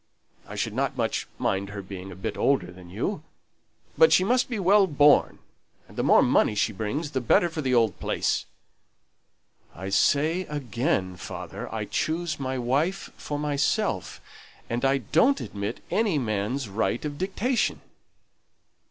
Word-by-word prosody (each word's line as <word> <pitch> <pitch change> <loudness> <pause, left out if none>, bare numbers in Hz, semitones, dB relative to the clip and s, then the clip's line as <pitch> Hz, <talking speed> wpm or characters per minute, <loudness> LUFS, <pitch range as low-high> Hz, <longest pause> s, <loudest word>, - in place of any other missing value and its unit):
I - - -8
shouldn't - - -2
much - - -1
mind 100 +1 -1
her 100 -1 -7
being 95 0 -8
a - - -9
bit 95 - -4
older 95 -11 +1
than 90 -1 -13
you, 130 - -3 0.7
but 480 -1 +6
she - - +5
must 245 +6 +2
be 240 - -2
well 195 +1 +4
born, 145 -2 +4 0.5
and - - -16
the - - -1
more - - +5
money 105 - +3
she 105 +1 +1
brings 135 - -3
the 130 -3 -1
better 170 +8 +3
for 160 -1 -4
the 130 -3 +1
old 115 -3 +2
place." - - -1 1.3
"I 95 +3 -6
say 155 - +2
again, 120 - -2
father, - - -7
I - - -3
choose 160 -1 -2
my 130 -1 -2
wife 140 +10 -1
for 145 - -5
myself, 145 - -1 0.5
and 120 +2 -1
I 135 +1 +3
don't 165 - +2
admit 100 0 -5
any 210 -7 +2
man's 115 +1 -2
right 110 +6 -1
of 145 -1 -5
dictation." 215 +7 0
140 Hz, 150 wpm, -26 LUFS, 105-170 Hz, 1.3 s, but